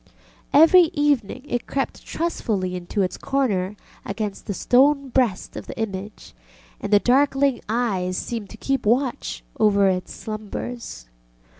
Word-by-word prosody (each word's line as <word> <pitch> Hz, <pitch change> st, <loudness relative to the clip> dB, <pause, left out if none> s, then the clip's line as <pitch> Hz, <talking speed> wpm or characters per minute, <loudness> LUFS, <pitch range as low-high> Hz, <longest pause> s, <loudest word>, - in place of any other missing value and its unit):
Every 330 Hz, +4 st, +7 dB
evening 285 Hz, -, 0 dB
it 245 Hz, -3 st, -3 dB
crept 275 Hz, -, -3 dB
trustfully 215 Hz, -, -2 dB
into 180 Hz, +3 st, -2 dB
its 185 Hz, -, -3 dB
corner 210 Hz, -8 st, 0 dB, 0.3 s
against 205 Hz, 0 st, -5 dB
the 205 Hz, -, -1 dB
stone 275 Hz, +4 st, +3 dB
breast 240 Hz, -6 st, 0 dB
of -, -, -7 dB
the -, -, -8 dB
image, 205 Hz, -1 st, -5 dB, 0.5 s
and 205 Hz, -, -5 dB
the 205 Hz, -, +7 dB
darkling 270 Hz, +3 st, +2 dB
eyes 195 Hz, -6 st, 0 dB
seemed 225 Hz, -4 st, -4 dB
to 220 Hz, -, -11 dB
keep 270 Hz, -1 st, -1 dB
watch 255 Hz, +4 st, 0 dB, 0.2 s
over 200 Hz, -2 st, +4 dB
its 185 Hz, -1 st, -2 dB
slumbers. 215 Hz, -, -6 dB
225 Hz, 135 wpm, -23 LUFS, 200-270 Hz, 0.5 s, Every